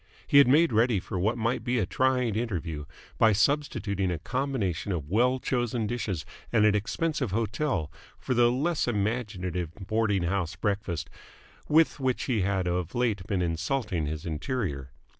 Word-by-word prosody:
He 140 - +6
had 140 - +7
made 150 +1 +4
ready 115 -1 +3
for 90 +1 -5
what 110 +6 +1
might 115 +2 -1
be 125 0 0
a 110 - +2
trying 125 +2 +1
interview 85 -10 -3 0.3
by 110 -1 +6
substituting 100 -5 +1
a 90 - -1
combination 105 - -2
of 80 -4 -4
well 125 +5 +3
chosen 120 -3 -1
dishes 100 -8 -3 0.3
at 110 -3 +4
an 105 - +5
expensive 130 +6 -1
hotel 110 - -1 0.3
for 130 - -2
the 120 -1 +5
less 150 +5 0
imaginative 100 -6 -2
boarding 105 -1 0
house 90 0 -1
breakfast 100 -5 -2 0.6
with 160 0 +3
which 130 -2 0
he 120 -6 0
had 95 -1 0
of 90 -1 -2
late 110 -6 0
been 95 -4 0
insulting 85 - -1
his 75 0 -5
interior. 80 - -3
105 Hz, 160 wpm, -28 LUFS, 90-125 Hz, 0.6 s, had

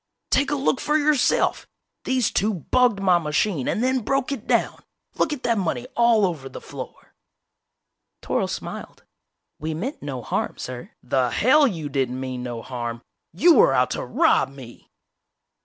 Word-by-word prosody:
"Take 280 -1 +3
a 290 - 0
look 270 -1 0
for 300 +1 +2
yourself! 300 -2 +2 0.4
These 255 -3 +1
two 210 +1 +1
bugged 240 - +2
my 185 -3 +4
machine 150 -1 -1
and 220 - 0
then 260 0 +2
broke 275 +3 -1
it 275 - -5
down! - - +1 0.3
Look - - 0
at 295 -4 -5
that 230 -3 +1
money 160 -10 -2
all 235 -3 +4
over 155 -7 -4
the - - -8
floor!" - - -10 1.1
Toryl - - -1
smiled. - - -7 0.6
"We 155 +1 -3
meant 250 - -5
no 130 -4 -5
harm, - - -2
sir 125 -1 -7
" - - -52
"The 125 0 +1
hell 280 - +4
you 165 - -4
didn't 130 -2 -2
mean 130 -1 -4
no 120 -2 -5
harm! 120 -1 -5 0.3
You 330 - +5
were 460 +9 +5
out - - +2
to - - -3
rob 320 - +2
me!" 130 -4 -13
185 Hz, 170 wpm, -23 LUFS, -, 1.1 s, You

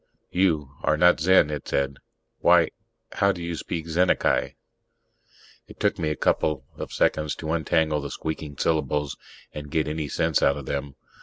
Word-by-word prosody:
"You... 80 -7 +1
are 75 - +2
not 90 +1 +5
Zen," 90 -2 +4
it 75 -2 -5
said. 70 0 -1 0.4
"Why - - +5 0.4
how 100 0 +2
do 85 -3 -6
you 85 0 -3
speak 80 0 -4
Zennacai?" 90 +3 +1 1.1
It - - -14
took - - +1
me 80 - 0
a 75 - -1
couple 70 -1 0
of - - -7
seconds 75 -1 +1
to 80 -1 -5
untangle 80 -2 +1
the 70 - -5
squeaking 75 -1 -5
syllables 75 -2 0 0.4
and 75 -1 -7
get 80 0 0
any 75 0 -3
sense 80 +2 +1
out 70 - +3
of 70 - -7
them. 70 0 -4
75 Hz, 165 wpm, -25 LUFS, 70-80 Hz, 1.1 s, not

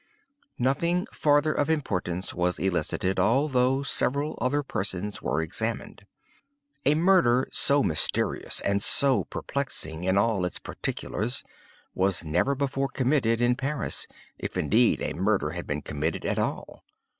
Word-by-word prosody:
"Nothing 170 +8 +1
farther 145 +1 +2
of 145 - 0
importance 95 - -1
was 90 0 0
elicited, 95 +1 -1
although 130 +5 +2
several 140 +2 +1
other 145 +3 +1
persons 100 -4 -3
were 80 - -1
examined. 80 - -4 0.8
A 145 - +5
murder 155 -8 +4
so 140 0 +3
mysterious, 80 -1 +1
and 100 0 0
so 135 +4 +3
perplexing 85 - -3
in 95 +1 +2
all 100 -2 +2
its 90 - -2
particulars, 120 +5 -3 0.5
was 95 -2 +1
never 90 - +1
before 135 0 -1
committed 125 -4 +1
in 120 0 +3
Paris—if 140 +3 -4
indeed 115 +3 +2
a - - -2
murder 95 -3 0
has 85 +1 -6
been 75 0 -3
committed 75 +2 -3
at - - 0
all. - - -4
120 Hz, 130 wpm, -26 LUFS, 95-140 Hz, 0.8 s, A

